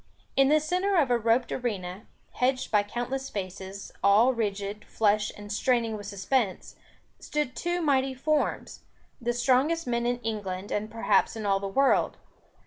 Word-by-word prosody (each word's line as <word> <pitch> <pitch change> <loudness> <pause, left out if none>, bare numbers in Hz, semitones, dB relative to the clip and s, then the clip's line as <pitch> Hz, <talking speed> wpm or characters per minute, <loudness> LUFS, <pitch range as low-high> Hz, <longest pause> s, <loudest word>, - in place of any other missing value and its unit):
In 270 0 +5
the 305 +1 +5
centre 365 +6 0
of 290 -7 +3
a 240 - +4
roped 230 +2 +2
arena, 200 -5 -4 0.2
hedged 255 +1 0
by 210 - +5
countless 245 +6 -4
faces, 190 0 -6
all 215 +6 +5
rigid, 205 -2 -3
flushed, 210 -1 +1
and 205 0 -9
straining 230 0 +1
with 205 -1 -7
suspense, 200 +1 -1 0.4
stood 295 -4 -2
two 350 0 -1
mighty 270 -3 +2
forms; 300 +3 -1 0.4
the 240 0 0
strongest 265 +7 +2
men 235 -1 0
in 245 0 0
England 205 -3 -4
and 215 +1 -2
perhaps 220 -2 +2
in 220 -2 -5
all 195 -1 +2
the 200 - -4
world. 270 +8 +2
235 Hz, 155 wpm, -27 LUFS, 205-265 Hz, 0.4 s, In